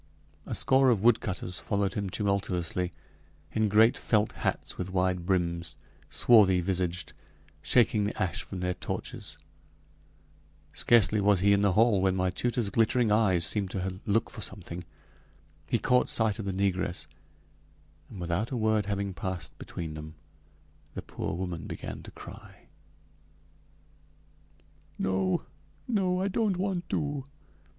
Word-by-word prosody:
A - - -2
score 130 0 +4
of 110 -5 +2
woodcutters 100 -6 +1
followed 100 -2 -1
him 100 -2 -2
tumultuously, 90 -3 -1 0.6
in 110 -1 +1
great 110 +3 +5
felt 105 -1 +1
hats - - -3
with 90 0 -4
wide 90 -1 0
brims 85 -4 0 0.3
swarthy 100 -6 +5
visaged 90 -2 -1 0.5
shaking 110 -4 +3
the 105 - -4
ash 90 -2 0
from 95 -2 -6
their 90 0 0
torches. - - -6 1.4
Scarcely 110 -3 +4
was 100 -2 +4
he 100 +1 +5
in 100 - +3
the 100 -2 +3
hall 110 -1 +4
when 95 -1 +2
my 95 -1 +1
tutor's 120 0 -1
glittering 115 +1 +2
eyes 95 -6 +3
seemed 100 -3 0
to 95 0 -4
look 105 +2 +1
for 110 - -7
something. 90 -3 -5 0.8
He - - +1
caught 125 0 +2
sight 110 -3 +2
of 105 - -4
the 100 - -1
negress, 95 -4 0 1.0
and 100 - -9
without 90 +6 -1
a 130 - -3
word 110 -2 +1
having 100 -1 -2
passed 90 0 -5
between 80 -3 -6
them, 75 +1 -8 0.8
the - - -5
poor - - -4
woman 90 -2 -4
began - - -6
to - - -10
cry: - - -13 2.3
"No! 95 0 0 0.4
no! 185 -6 +1
I 195 - +1
don't 200 -1 0
want 185 -2 -2
to!" 145 -2 -2
100 Hz, 140 wpm, -29 LUFS, 90-110 Hz, 2.3 s, great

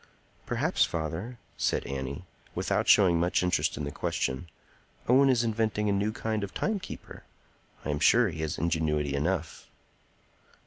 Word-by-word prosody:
"Perhaps, - - +1
father," 85 +9 -3 0.2
said - - 0
Annie, 70 +6 -5 0.3
without - - 0
showing 90 -5 +6
much 90 +1 +1
interest 90 -1 +1
in 75 - -3
the 70 - -3
question, 65 +6 -2 0.6
"Owen 135 +3 +5
is 120 -2 +3
inventing 110 -2 0
a - - +2
new 100 +2 +1
kind 110 -1 -2
of 100 - -6
timekeeper. 210 -3 -4 0.6
I 75 - 0
am 75 - -1
sure 115 +6 +5
he 80 -2 -6
has 80 -2 -2
ingenuity 75 -3 0
enough." 80 +3 -2
90 Hz, 145 wpm, -28 LUFS, 75-110 Hz, 0.6 s, showing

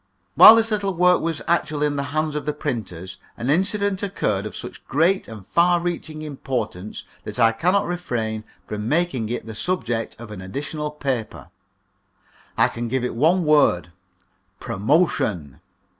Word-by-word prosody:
While 220 - +10
this 225 0 +2
little 200 -3 0
work 180 +1 +4
was 165 -2 -2
actually 155 -3 +1
in 145 -1 -1
the 140 0 -2
hands 155 +1 -1
of 150 - -4
the 150 - 0
printers, 95 - -5 0.2
an 125 +4 -1
incident 195 +3 +1
occurred 105 - -1
of - - -9
such 120 - -8
great 170 +7 +2
and 110 -4 -10
far 175 - +3
reaching 165 -3 -4
importance 130 -9 -4 0.2
that - - -6
I 115 -1 +5
cannot 180 - +1
refrain 115 -11 -3 0.2
from 105 +1 -4
making 150 -9 0
it 120 - -3
the 110 - -7
subject 120 -5 -2
of 115 -2 -10
an 100 -3 -7
additional 145 +10 -4
paper. 135 -6 -4 1.1
I - - +5
can 120 0 -5
give 130 +1 -1
it 125 - -1
in - - -9
one 165 +6 +3
word 140 - +3 0.7
promotion. 105 - 0
145 Hz, 160 wpm, -22 LUFS, 115-175 Hz, 1.1 s, While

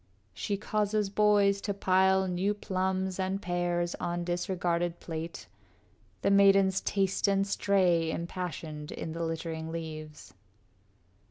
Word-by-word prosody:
She 200 - -2
causes 210 0 0
boys 200 -1 +3
to 200 -1 -2
pile 190 0 +3
new 185 +3 0
plums 190 -1 -2
and 190 +1 -1
pears 175 -1 -1
On 175 0 -2
disregarded 175 -1 -1
plate. 165 0 -6 0.8
The - - +3
maidens 195 -1 +5
taste 195 0 0
And 195 0 +2
stray 185 -5 +2
impassioned 160 -3 -5
in 160 - -5
the 165 +1 -3
littering 160 0 -4
leaves. 155 -7 -7
185 Hz, 115 wpm, -30 LUFS, 170-195 Hz, 0.8 s, maidens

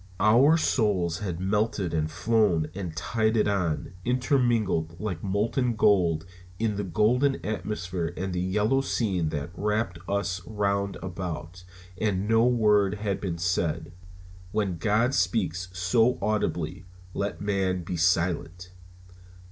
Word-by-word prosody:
Our 125 +10 +5
souls 95 - +1
had 90 -5 -4
melted 100 -2 0
and 80 -1 0
flown 90 -4 +1
and 90 -5 -6
tided 110 +1 +1
on, 90 -4 -1
intermingled 120 - +1
like 95 -5 -4
molten 115 +5 0
gold 90 -7 +3 0.3
in 110 -1 0
the 100 - -2
golden 115 - +2
atmosphere 90 -5 -3
and 95 0 -3
the 90 - -1
yellow 105 +8 +1
scene 95 - 0
that 75 +2 -4
wrapped 105 -2 -1
us 95 -2 -1
round 100 -2 -1
about, 90 -1 -6 0.4
and 100 -2 0
no 115 +2 +4
word 105 -5 +3
had 105 -1 -3
been 90 -4 -3
said. 85 -1 -1 0.6
When 100 -5 -1
God 110 +7 +2
speaks 90 -2 0
so 100 +8 +2
audibly 90 -4 -2 0.3
let 100 0 -3
man 95 -3 0
be 90 - -4
silent. 90 +1 0
100 Hz, 125 wpm, -27 LUFS, 90-110 Hz, 0.6 s, Our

